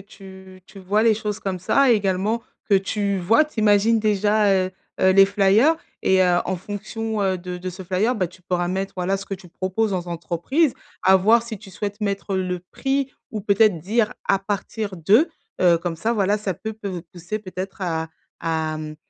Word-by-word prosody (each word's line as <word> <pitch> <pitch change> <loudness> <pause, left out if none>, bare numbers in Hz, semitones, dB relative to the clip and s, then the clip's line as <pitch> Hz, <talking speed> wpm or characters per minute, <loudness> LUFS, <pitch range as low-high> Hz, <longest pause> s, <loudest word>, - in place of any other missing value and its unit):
tu 190 -1 -13
tu 195 -1 -13
voies 205 +4 +1
les 225 -2 +5
choses 210 -1 -4
comme 185 -2 -4
ça, 270 +6 +4
également 205 +2 0 0.3
que 200 - +4
tu 200 +1 0
voies, 225 - +4
tu 300 -7 -5
imagines 215 +2 +4
déjà, 210 0 +2
heu 185 -1 +1 0.3
heu, 190 - +5
les 195 0 +8
flyer 200 +10 +4 0.3
et 190 0 +3
heu, 180 -1 +3
en 185 0 -2
fonction, 210 +3 -4
heu, 190 -1 +1
de 180 0 -6
de 185 +1 -5
ce 185 +1 -9
flyer, 200 +8 +1
bah, 185 - 0
tu 185 +2 -17
pourras 175 0 -1
mettre, 190 +2 -2
voilà, 185 +2 0
ce 195 - -7
que 195 - -4
tu 185 -1 -13
proposes 190 +5 -1
aux 180 -1 -3
entreprises. 175 - 0 0.3
À 190 +1 +6
voir, 220 +5 +4
si 230 -2 -6
tu 195 -1 -13
souhaites, 205 +3 -5
mettre 200 -1 -2
le 180 -1 -1
prix 270 -1 -1 0.2
ou 215 - -4
peut-être 200 -2 +3
dire 215 +6 0 0.2
à 195 - +3
partir 200 0 -4
de 210 - +4 0.3
heu, 175 -2 +5
comme 170 -1 -3
ça, 220 +8 -1
voilà, 205 -1 +2
ça 195 -3 -3
peut 220 +5 -6
peut 200 -5 -6
pousser 180 +4 -5
peut-être, 190 -1 -7
à 160 -2 -2 0.3
à 160 -1 -1
hem, 155 0 -6
195 Hz, 200 wpm, -22 LUFS, 185-215 Hz, 0.3 s, les